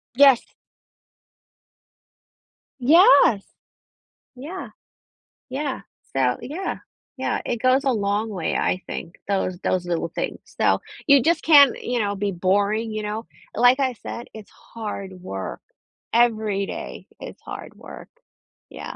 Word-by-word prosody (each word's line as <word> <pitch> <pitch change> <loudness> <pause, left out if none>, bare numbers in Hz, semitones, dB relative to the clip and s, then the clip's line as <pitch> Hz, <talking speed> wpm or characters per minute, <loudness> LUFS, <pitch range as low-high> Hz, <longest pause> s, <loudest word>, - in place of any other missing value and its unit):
Yes. 275 -2 +6 2.3
Yes! 295 - +6 0.9
Yeah, 315 +9 -7 0.8
yeah, 270 +1 -3 0.3
so 125 -2 +2
Yeah, 330 +9 -4 0.4
yeah, - - -1
it 240 - -1
goes 255 +3 +3
a 265 - +3
long 210 0 -1
way, 180 -6 -3
I 185 - 0
think, 170 - -7
those 190 -2 -1
those 180 -1 0
little 170 -1 -1
things. - - -4
So - - +1 0.3
you 280 -3 +6
just 335 +2 +2
can't, 285 -5 +7
you 245 0 -2
know, 205 -2 -1
be 200 0 -2
boring, 205 +5 0
you 215 0 -3
know, 215 +2 -4 0.3
like 245 +4 +5
I 260 -2 +1
said, 240 - -6
it's 215 -2 -11
hard 205 -4 -7
work, 95 - -6 0.5
every 220 -4 +2
day, - - -7
it's - - -10
hard - - -9
work. - - -12 0.6
Yeah. - - -8
220 Hz, 125 wpm, -23 LUFS, 200-260 Hz, 2.3 s, can't